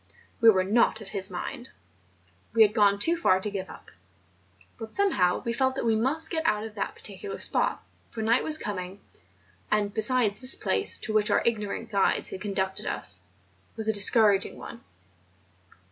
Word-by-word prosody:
We 230 Hz, -, +7 dB
were 190 Hz, -4 st, +3 dB
not 220 Hz, +3 st, +1 dB
of 210 Hz, -3 st, -7 dB
his 195 Hz, -1 st, 0 dB
mind; 195 Hz, +6 st, -7 dB, 0.8 s
we 225 Hz, -1 st, +6 dB
had 210 Hz, -1 st, +1 dB
gone 205 Hz, -2 st, +3 dB
too 330 Hz, +12 st, +2 dB
far 190 Hz, -, +2 dB
to 205 Hz, +2 st, -5 dB
give 190 Hz, -2 st, -6 dB
up; -, -, -14 dB, 0.9 s
but 225 Hz, -1 st, -7 dB
somehow 260 Hz, -, +1 dB
we 235 Hz, -, -2 dB
felt 260 Hz, +1 st, 0 dB
that 265 Hz, -, -3 dB
we 225 Hz, -1 st, +2 dB
must 285 Hz, +8 st, +1 dB
get 320 Hz, -2 st, -2 dB
out 210 Hz, -5 st, 0 dB
of 220 Hz, -1 st, -8 dB
that -, -, -5 dB
particular 415 Hz, -1 st, -7 dB
spot, -, -, -1 dB, 0.3 s
for 220 Hz, -, -6 dB
night 230 Hz, +3 st, +2 dB
was 310 Hz, -1 st, +4 dB
coming 185 Hz, -7 st, -6 dB
on; 200 Hz, -, -20 dB, 0.8 s
and 205 Hz, 0 st, -5 dB
besides 220 Hz, -1 st, +3 dB
this 255 Hz, 0 st, +5 dB
place, -, -, +1 dB
to 220 Hz, -, -4 dB
which 215 Hz, -1 st, +2 dB
our -, -, +1 dB
ignorant 225 Hz, 0 st, -3 dB
guides 200 Hz, -2 st, +1 dB
had 190 Hz, -, -8 dB
conducted 190 Hz, -2 st, -3 dB
us, 90 Hz, -, -3 dB, 0.6 s
was 220 Hz, -1 st, -3 dB
a 220 Hz, -, +1 dB
discouraging 205 Hz, -1 st, +3 dB
one. 235 Hz, -, -11 dB
215 Hz, 180 wpm, -26 LUFS, 200-235 Hz, 0.9 s, We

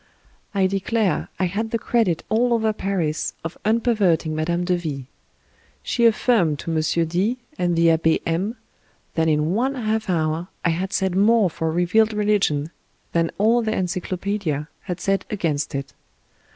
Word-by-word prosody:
I 195 Hz, -1 st, +3 dB
declare 195 Hz, +2 st, 0 dB
I 185 Hz, -, +2 dB
had 210 Hz, +5 st, -2 dB
the 230 Hz, -, 0 dB
credit 220 Hz, -7 st, +1 dB
all 235 Hz, +2 st, +2 dB
over 220 Hz, -1 st, +1 dB
Paris 170 Hz, -7 st, -2 dB
of 165 Hz, +1 st, -5 dB
unperverting 210 Hz, -8 st, +2 dB
Mme. 170 Hz, +3 st, 0 dB
de 180 Hz, 0 st, +1 dB
V. 150 Hz, -6 st, -4 dB, 0.8 s
She 235 Hz, -1 st, +3 dB
affirmed 215 Hz, -, +2 dB
to 165 Hz, +2 st, -3 dB
M. 160 Hz, -, +2 dB, 0.3 s
D 190 Hz, +9 st, 0 dB, 0.2 s
and 175 Hz, -1 st, +1 dB
the 165 Hz, 0 st, +5 dB
Abbe 160 Hz, 0 st, +2 dB
M 185 Hz, +8 st, -1 dB, 0.6 s
that 160 Hz, 0 st, +1 dB
in 155 Hz, +2 st, +2 dB
one 260 Hz, +6 st, 0 dB
half 220 Hz, -4 st, -1 dB
hour 160 Hz, 0 st, 0 dB, 0.2 s
I -, -, +4 dB
had 180 Hz, +4 st, -1 dB
said 190 Hz, -2 st, 0 dB
more 205 Hz, -1 st, +4 dB
for 160 Hz, 0 st, -2 dB
revealed 180 Hz, +6 st, +2 dB
religion 200 Hz, -8 st, +1 dB, 0.4 s
than 165 Hz, -1 st, +1 dB
all 225 Hz, +4 st, +3 dB
their 220 Hz, -1 st, -1 dB
encyclopaedia 180 Hz, -3 st, -2 dB, 0.2 s
had 180 Hz, -2 st, -4 dB
said 195 Hz, +2 st, 0 dB
against 150 Hz, -9 st, -1 dB
it. 140 Hz, 0 st, -4 dB
185 Hz, 155 wpm, -22 LUFS, 165-215 Hz, 0.8 s, the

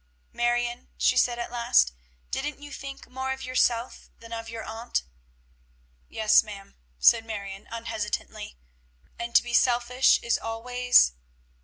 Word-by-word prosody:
"Marion," 240 Hz, 0 st, -1 dB
she -, -, +3 dB
said 245 Hz, -1 st, +2 dB
at 235 Hz, -, -5 dB
last, 150 Hz, -, +3 dB, 0.4 s
"didn't 295 Hz, +1 st, -3 dB
you 290 Hz, 0 st, -11 dB
think 275 Hz, 0 st, -8 dB
more 265 Hz, +1 st, -4 dB
of 265 Hz, 0 st, -5 dB
yourself 250 Hz, -1 st, 0 dB
than 230 Hz, 0 st, -10 dB
of 230 Hz, 0 st, -6 dB
your 230 Hz, -1 st, -6 dB
aunt?" 230 Hz, +2 st, -3 dB, 1.1 s
"Yes, 215 Hz, -1 st, +4 dB
ma'am," 200 Hz, -2 st, -11 dB, 0.2 s
said -, -, +5 dB
Marion 200 Hz, -3 st, -7 dB
unhesitatingly. 220 Hz, -, -5 dB, 0.6 s
"And 235 Hz, 0 st, -5 dB
to -, -, +7 dB
be 240 Hz, 0 st, -7 dB
selfish 245 Hz, +1 st, +4 dB
is 235 Hz, -, +1 dB
always?" 245 Hz, -, +3 dB
235 Hz, 135 wpm, -26 LUFS, 225-250 Hz, 1.1 s, to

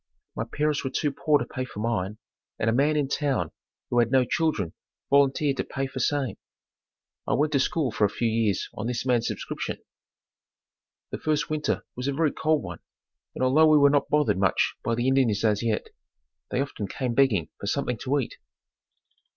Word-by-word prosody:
My -, -, -2 dB
parents 150 Hz, 0 st, 0 dB
were 135 Hz, -, -1 dB
too 145 Hz, +2 st, 0 dB
poor 150 Hz, +2 st, +2 dB
to -, -, -3 dB
pay 130 Hz, -, -4 dB
for 125 Hz, -5 st, -8 dB
mine, 105 Hz, -2 st, -1 dB, 0.4 s
and 115 Hz, -, +1 dB
a -, -, 0 dB
man 145 Hz, +5 st, +2 dB
in 145 Hz, -2 st, +1 dB
town, 135 Hz, -, -1 dB, 0.4 s
who 120 Hz, -, +3 dB
had 115 Hz, -1 st, +3 dB
no 130 Hz, -2 st, +4 dB
children 135 Hz, -, 0 dB, 0.4 s
volunteered 140 Hz, 0 st, +3 dB
to -, -, 0 dB
pay 135 Hz, 0 st, -3 dB
for 135 Hz, 0 st, -6 dB
same. 135 Hz, -4 st, 0 dB, 0.9 s
I -, -, +2 dB
went 150 Hz, +1 st, +1 dB
to 140 Hz, -, +3 dB
school 140 Hz, -1 st, 0 dB
for 105 Hz, -, +2 dB
a -, -, +1 dB
few 115 Hz, +3 st, -1 dB
years 110 Hz, -3 st, 0 dB
on 110 Hz, -, -4 dB
this 125 Hz, 0 st, -2 dB
man's 120 Hz, -3 st, +2 dB
subscription. -, -, -4 dB, 1.3 s
The -, -, -4 dB
first 155 Hz, 0 st, 0 dB
winter 155 Hz, -1 st, -1 dB
was 125 Hz, +2 st, -4 dB
a 140 Hz, -, 0 dB
very 155 Hz, +1 st, +2 dB
cold 155 Hz, -1 st, +1 dB
one 85 Hz, -3 st, -7 dB, 0.6 s
and -, -, -2 dB
although 145 Hz, +5 st, +5 dB
we 155 Hz, -1 st, +6 dB
were 140 Hz, -1 st, +6 dB
not 145 Hz, -1 st, +1 dB
bothered 140 Hz, -11 st, +2 dB
much 95 Hz, -2 st, +2 dB
by 115 Hz, -, 0 dB
the 120 Hz, +2 st, 0 dB
Indians 120 Hz, -6 st, +2 dB
as 105 Hz, -2 st, +2 dB
yet, 115 Hz, -2 st, -1 dB, 0.6 s
they -, -, -1 dB
often 125 Hz, -7 st, -4 dB
came 125 Hz, +1 st, -3 dB
begging 115 Hz, -, +2 dB
for 100 Hz, -, -5 dB
something 125 Hz, 0 st, -1 dB
to 135 Hz, +2 st, 0 dB
eat. 135 Hz, -, -3 dB
130 Hz, 195 wpm, -26 LUFS, 115-145 Hz, 1.3 s, we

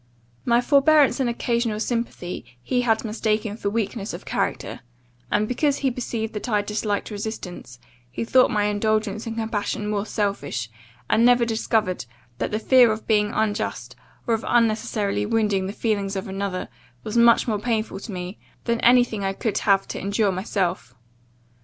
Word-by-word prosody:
My 235 Hz, 0 st, +4 dB
forbearance 285 Hz, +2 st, +4 dB
and 255 Hz, -3 st, +1 dB
occasional 235 Hz, -2 st, -1 dB
sympathy 230 Hz, -6 st, -3 dB, 0.2 s
he 250 Hz, -, +1 dB
had 225 Hz, -2 st, +1 dB
mistaken 215 Hz, -1 st, -1 dB
for 205 Hz, -2 st, -2 dB
weakness 210 Hz, -1 st, -2 dB
of -, -, -10 dB
character; -, -, -2 dB, 0.5 s
and, 210 Hz, +1 st, +1 dB
because 280 Hz, +4 st, +1 dB
he 270 Hz, -2 st, 0 dB
perceived 235 Hz, -2 st, -4 dB
that 215 Hz, +4 st, -5 dB
I 210 Hz, -2 st, +2 dB
disliked 210 Hz, 0 st, -2 dB
resistance, 205 Hz, -, -6 dB, 0.3 s
he 125 Hz, -, -4 dB
thought 255 Hz, +2 st, +5 dB
my 210 Hz, -1 st, +1 dB
indulgence 215 Hz, +1 st, 0 dB
and 225 Hz, -, -4 dB
compassion 215 Hz, -1 st, -2 dB
mere 205 Hz, 0 st, -1 dB
selfishness, 200 Hz, -, -2 dB, 0.4 s
and 230 Hz, -, +3 dB
never 245 Hz, 0 st, +5 dB
discovered 220 Hz, -, 0 dB, 0.3 s
that -, -, -1 dB
the 210 Hz, -, -1 dB
fear 245 Hz, +1 st, +5 dB
of 215 Hz, 0 st, -4 dB
being 210 Hz, -2 st, +2 dB
unjust, 215 Hz, 0 st, -2 dB, 0.3 s
or 235 Hz, -, +1 dB
of 225 Hz, -, -1 dB
unnecessarily 220 Hz, -3 st, +1 dB
wounding 210 Hz, -4 st, +1 dB
the -, -, -3 dB
feelings 200 Hz, -2 st, -1 dB
of 190 Hz, -, -4 dB
another, 195 Hz, -1 st, -3 dB, 0.4 s
was 215 Hz, -, -5 dB
much 235 Hz, +1 st, +5 dB
more 215 Hz, -3 st, 0 dB
painful 220 Hz, -3 st, -2 dB
to 210 Hz, -, -8 dB
me, 180 Hz, +1 st, -6 dB, 0.2 s
than 235 Hz, -1 st, 0 dB
any 245 Hz, +1 st, +6 dB
thing 220 Hz, -4 st, -5 dB
I 195 Hz, 0 st, 0 dB
could 215 Hz, +2 st, -1 dB
have 195 Hz, -1 st, +2 dB
to -, -, -4 dB
endure 200 Hz, +1 st, +1 dB
myself. 180 Hz, -, -2 dB
215 Hz, 165 wpm, -23 LUFS, 200-235 Hz, 0.5 s, any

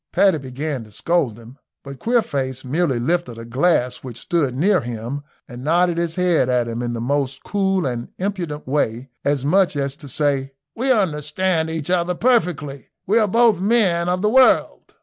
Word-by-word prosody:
Paddy 190 Hz, -6 st, +3 dB
began 135 Hz, 0 st, -4 dB
to -, -, -16 dB
scold 135 Hz, -2 st, 0 dB
him, 120 Hz, +4 st, -14 dB, 0.2 s
but 140 Hz, -1 st, -9 dB
Queerface 135 Hz, -, -1 dB
merely 145 Hz, 0 st, 0 dB
lifted 150 Hz, -2 st, -1 dB
a 115 Hz, -, -8 dB
glass 125 Hz, 0 st, +1 dB
which 125 Hz, -3 st, -9 dB
stood 165 Hz, -9 st, 0 dB
near 185 Hz, +8 st, +3 dB
him 120 Hz, +4 st, -5 dB, 0.3 s
and 125 Hz, +1 st, -9 dB
nodded 170 Hz, +3 st, +2 dB
his 170 Hz, -1 st, -2 dB
head 175 Hz, -8 st, +2 dB
at 125 Hz, -2 st, +1 dB
him 115 Hz, +1 st, -4 dB
in 120 Hz, -1 st, -2 dB
the 115 Hz, -, -4 dB
most 135 Hz, +2 st, -1 dB
cool 195 Hz, -3 st, 0 dB
and 120 Hz, -2 st, -3 dB
impudent 180 Hz, -7 st, -4 dB
way, 130 Hz, -2 st, -1 dB
as 140 Hz, -1 st, 0 dB
much 185 Hz, +2 st, +3 dB
as 140 Hz, -1 st, -2 dB
to 150 Hz, -3 st, -11 dB
say, 140 Hz, -1 st, 0 dB, 0.2 s
"We 260 Hz, +3 st, +1 dB
understand 165 Hz, -, 0 dB
each 160 Hz, 0 st, -3 dB
other 180 Hz, 0 st, +1 dB
perfectly 175 Hz, -, 0 dB, 0.2 s
we 215 Hz, +5 st, +3 dB
are 215 Hz, -, +3 dB
both 230 Hz, -1 st, +3 dB
men 190 Hz, -5 st, +2 dB
of 180 Hz, +2 st, -1 dB
the 210 Hz, -, +3 dB
world." 260 Hz, +2 st, +3 dB
150 Hz, 180 wpm, -21 LUFS, 130-180 Hz, 0.3 s, Paddy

